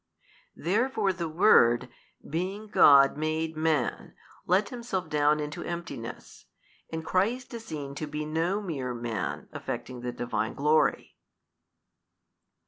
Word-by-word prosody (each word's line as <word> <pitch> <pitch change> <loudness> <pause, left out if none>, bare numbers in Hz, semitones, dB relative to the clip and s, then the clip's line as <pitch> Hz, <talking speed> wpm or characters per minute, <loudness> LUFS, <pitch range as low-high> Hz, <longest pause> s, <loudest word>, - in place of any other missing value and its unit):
Therefore 205 - +1
the 170 -2 -4
Word, 120 - +5 0.4
being 190 +7 -3
God, 140 -7 +6
made 155 +1 -1
Man 155 -5 -1 0.3
let 195 +3 +3
Himself 235 -7 -4
down 150 0 +3
into 150 +3 -4
emptiness; 170 -9 -7 0.4
and 160 0 -4
Christ 230 +10 0
is 230 -1 -7
seen 140 -3 -6
to 150 +2 -5
be 150 +1 -4
no 165 +7 -1
mere 135 -9 -3
man, 115 -5 -4
affecting 120 +1 -6
the 125 0 -3
Divine 120 0 -3
Glory. 150 +2 +1
155 Hz, 120 wpm, -28 LUFS, 140-185 Hz, 0.4 s, God